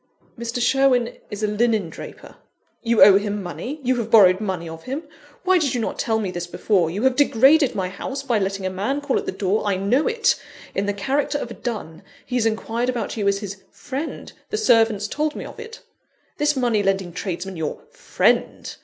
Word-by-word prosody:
"Mr. 235 +1 -4
Sherwin 250 -1 +2
is 210 0 -6
a - - +3
linen 215 -2 +1
draper - - -11 0.2
" - - -44
"You 230 -4 +5
owe 195 0 +8
him 205 0 -3
money? 180 - -6
you 255 0 +1
have 230 -2 -3
borrowed 195 -4 +6
money 185 -5 -3
of 160 0 -9
him? 275 +5 -4 0.4
Why 370 0 +4
did 280 -6 0
you - - 0
not 225 - -3
tell 225 -4 +1
me 205 -4 -2
this 175 -1 -5
before? 175 -1 +1
You 200 +7 -3
have 260 -1 +3
degraded 280 +1 +4
my 190 -2 -1
house 270 +8 -5
by 240 -5 +1
letting 195 0 -2
a 185 - -1
man 215 +10 -2
call 285 -2 0
at - - -8
the - - 0
door 195 +2 0
I 200 - +2
know 205 +10 +1
it! 460 -1 +1 0.3
in 200 +1 -1
the 205 - 0
character 270 +9 -1
of 240 - -5
a - - -4
dun. 205 -10 -6 0.2
He 245 - -9
has 230 -2 +2
inquired 225 +2 -1
about 240 -4 -3
you 205 -3 -1
as 200 0 +1
his 200 -1 -6
'friend,' 285 +3 -6 0.2
the 430 - -2
servants 225 - +3
told 300 +5 -2
me - - -6
of - - -10
it. 455 0 -9 0.6
This 295 0 +2
money 240 -5 +1
lending 195 -3 -1
tradesman, 185 +1 -4
your 160 -3 -4
_'friend! - - 0
220 Hz, 215 wpm, -22 LUFS, 195-265 Hz, 0.6 s, owe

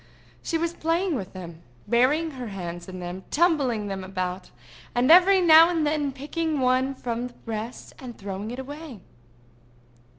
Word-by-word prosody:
She 330 - -1
was 335 +1 -2
playing 335 +3 0
with 195 -9 -4
them—burying 185 - -1
her 255 -4 -7
hands 175 -3 -6
in 185 0 -7
them, 180 +1 -6
tumbling 285 -10 +2
them 195 -1 -4
about, 185 -1 -4 0.5
and 250 +5 +3
every 370 +2 +7
now 325 -1 +8
and 330 -3 0
then 295 -2 0
picking 300 +3 -3
one 260 +1 +1
from 240 -1 -3
the 245 - -16
rest, 225 +1 -6
and 245 -3 -9
throwing 200 +1 -6
it 245 - -6
away. 285 -2 -8
255 Hz, 155 wpm, -25 LUFS, 195-315 Hz, 0.5 s, now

